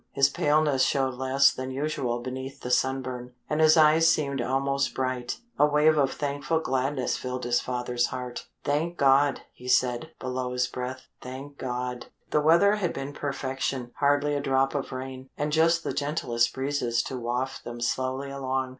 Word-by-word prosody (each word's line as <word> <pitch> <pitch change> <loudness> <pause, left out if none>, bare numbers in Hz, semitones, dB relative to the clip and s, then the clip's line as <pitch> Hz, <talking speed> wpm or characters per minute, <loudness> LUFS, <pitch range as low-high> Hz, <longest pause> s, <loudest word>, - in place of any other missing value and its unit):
His 140 0 +4
paleness 145 -1 +2
showed 135 -1 +2
less 130 +2 +3
than 130 0 -5
usual 130 -3 -2
beneath 130 +2 -6
the 125 - -4
sunburn, 130 -1 -1
and 150 +1 0
his 155 +1 +6
eyes 160 +1 +6
seemed 140 -3 0
almost 135 +2 0
bright. 130 -2 -2 0.2
A 150 - +6
wave 150 +1 +4
of 140 -3 +2
thankful 145 +2 -1
gladness 130 -2 -1
filled 125 0 -4
his 120 0 +1
father's 125 -1 -1
heart. 125 -1 -6 0.2
"Thank 155 +4 -1
God," 140 0 +4
he 125 - -12
said, 125 +3 +2
below 130 -1 -3
his 125 0 +1
breath. 130 +1 -5 0.2
"Thank 135 +3 -9
God." 125 -1 -4 0.2
The 150 - +3
weather 170 +7 +5
had 180 -5 -1
been 135 +1 -5
perfection, 135 -3 -3
hardly 145 +1 +2
a 145 - 0
drop 135 0 +1
of 140 -2 -3
rain, 130 0 -7
and 150 +1 -1
just 165 +2 +3
the - - -2
gentlest 125 -5 0
breezes 130 -3 -1
to 130 - -5
waft 125 +2 -3
them 120 0 -7
slowly 130 +3 -2
along. 130 -1 -2
135 Hz, 170 wpm, -27 LUFS, 125-145 Hz, 0.2 s, his